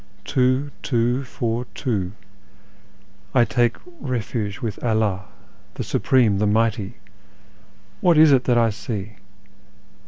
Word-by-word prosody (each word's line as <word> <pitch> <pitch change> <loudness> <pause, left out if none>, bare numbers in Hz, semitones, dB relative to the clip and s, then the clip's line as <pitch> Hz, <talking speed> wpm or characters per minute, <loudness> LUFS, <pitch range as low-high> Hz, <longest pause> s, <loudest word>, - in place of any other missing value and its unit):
Tivo, 130 +4 +1
two, 120 0 0
four, 120 -1 -2
two; 100 -8 -2 1.2
I 120 -2 +6
take 120 +1 +1 0.2
refuge 115 -5 -3
with 110 -4 -5
Allah, 110 -5 0 0.5
the - - -3
Supreme, 115 -7 +2
the 105 - +2
Mighty! 110 0 +1 1.0
What 175 -3 +4
is 155 -1 +7
it 130 -2 +4
that 120 -2 +3
I 115 -1 +3
see? 105 -1 -6
115 Hz, 115 wpm, -22 LUFS, 105-125 Hz, 1.2 s, is